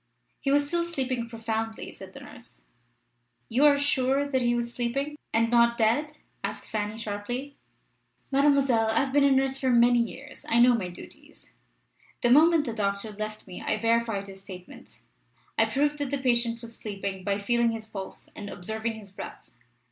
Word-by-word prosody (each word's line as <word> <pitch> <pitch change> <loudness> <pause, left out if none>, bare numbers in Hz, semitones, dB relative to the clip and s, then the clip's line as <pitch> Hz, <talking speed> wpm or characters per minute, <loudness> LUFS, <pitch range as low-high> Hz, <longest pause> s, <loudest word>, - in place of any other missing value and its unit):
"He 275 - -2
was 285 +1 +3
still 340 +3 0
sleeping 260 -8 -2
profoundly," 225 -1 -3
said - - -12
the - - -10
nurse. - - -11 0.9
"You 255 +6 +3
are 290 -1 +6
sure 280 0 +1
that 265 -2 0
he 240 0 +2
was 235 0 -2
sleeping, 275 +5 -2 0.2
and 230 +1 +2
not 235 0 +4
dead?" 240 +7 +2 0.3
asked - - -5
Fanny, 210 0 -2
sharply. 230 +6 -4 0.8
"Mademoiselle, 275 -5 +4
I 220 +1 +3
have 270 -1 -4
been 290 0 +5
a 280 - +6
nurse 270 0 +2
for 260 - +1
many 240 0 +5
years. 270 +5 -5
I 230 - +4
know 245 +1 +7
my 200 -6 -1
duties. 175 - -14 0.7
The 240 - +3
moment 315 +3 +6
the 235 - -3
doctor 200 0 -2
left 215 +1 -6
me 185 -2 -8
I - - 0
verified 230 -2 +1
his 195 -1 -10
statements. 185 -2 -12 0.5
I - - +4
proved 290 +2 0
that 285 -2 -2
the 280 - 0
patient 235 -3 +1
was 230 0 -9
sleeping 195 -2 -5
by 200 0 0
feeling 235 +3 +2
his 225 -1 -4
pulse 195 -3 -8
and 205 -1 -7
observing 220 +6 -3
his 205 -3 -11
breath." 195 - -9
235 Hz, 180 wpm, -27 LUFS, 215-270 Hz, 0.9 s, know